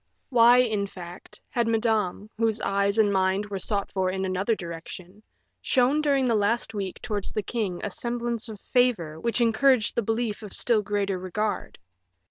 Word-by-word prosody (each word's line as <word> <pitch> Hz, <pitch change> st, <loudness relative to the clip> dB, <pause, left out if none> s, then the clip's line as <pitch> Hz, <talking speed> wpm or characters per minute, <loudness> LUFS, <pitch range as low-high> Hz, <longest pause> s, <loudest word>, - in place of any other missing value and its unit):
Why, 240 Hz, -1 st, +6 dB
in 220 Hz, -5 st, +2 dB
fact, 180 Hz, -2 st, -11 dB
had 235 Hz, -3 st, 0 dB
Madame, 220 Hz, -3 st, 0 dB
whose 225 Hz, 0 st, +1 dB
eyes 200 Hz, +1 st, +1 dB
and 210 Hz, -2 st, +3 dB
mind 190 Hz, +1 st, +1 dB
were 200 Hz, -2 st, -5 dB
sought 200 Hz, +1 st, -1 dB
for 190 Hz, -1 st, 0 dB
in 190 Hz, +1 st, -2 dB
another 190 Hz, +4 st, 0 dB
direction, 175 Hz, +2 st, -9 dB, 0.4 s
shown 265 Hz, +3 st, +2 dB
during 280 Hz, -3 st, +2 dB
the 240 Hz, -, +2 dB
last 225 Hz, +2 st, 0 dB
week 195 Hz, -3 st, -4 dB
towards 210 Hz, -5 st, -3 dB
the 215 Hz, -, -2 dB
king 195 Hz, -6 st, -3 dB
a 205 Hz, -, -3 dB
semblance 235 Hz, +1 st, -2 dB
of 215 Hz, -2 st, -8 dB
favor 200 Hz, -13 st, 0 dB
which 235 Hz, +5 st, 0 dB
encouraged 235 Hz, 0 st, +3 dB
the -, -, 0 dB
belief 225 Hz, 0 st, -2 dB
of 210 Hz, -2 st, -7 dB
still 230 Hz, -3 st, +3 dB
greater 200 Hz, -2 st, -1 dB
regard. 205 Hz, +4 st, -3 dB
210 Hz, 170 wpm, -26 LUFS, 195-235 Hz, 0.4 s, Why